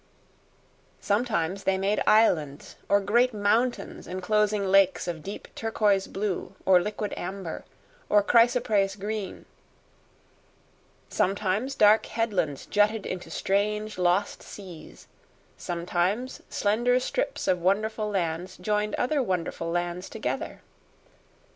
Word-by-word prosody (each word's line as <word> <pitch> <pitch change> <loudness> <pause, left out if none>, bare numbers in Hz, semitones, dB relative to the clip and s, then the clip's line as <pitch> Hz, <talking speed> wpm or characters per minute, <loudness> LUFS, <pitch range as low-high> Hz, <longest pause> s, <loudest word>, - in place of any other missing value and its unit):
Sometimes 200 -4 -1
they 190 0 +1
made 200 +2 0
islands 160 -10 +2
or 200 - +5
great 235 +4 +2
mountains 220 +4 0
enclosing 210 +2 0
lakes 190 -1 +3
of 170 -2 -4
deep 200 +6 -7
turquoise 210 -3 +1
blue, 195 -1 -3
or 185 -1 +6
liquid 210 +2 -4
amber, 185 -2 -6 0.4
or 210 -1 +5
chrysoprase 225 -4 +3
green; 210 -1 -5 1.6
sometimes 200 +7 0
dark 215 -1 +5
headlands 195 - -1
jutted 210 +1 +1
into 180 -3 -5
strange, 210 +3 -1
lost 180 +3 +1
seas; 185 -6 -11 0.5
sometimes 180 +7 -2
slender 240 +5 +2
strips - - -2
of 180 -1 +2
wonderful 210 +4 0
lands 180 -1 -2
joined 210 +2 -1
other 280 +3 +1
wonderful 175 -5 -2
lands 175 +1 -2
together. - - -4
200 Hz, 105 wpm, -27 LUFS, 185-215 Hz, 1.6 s, or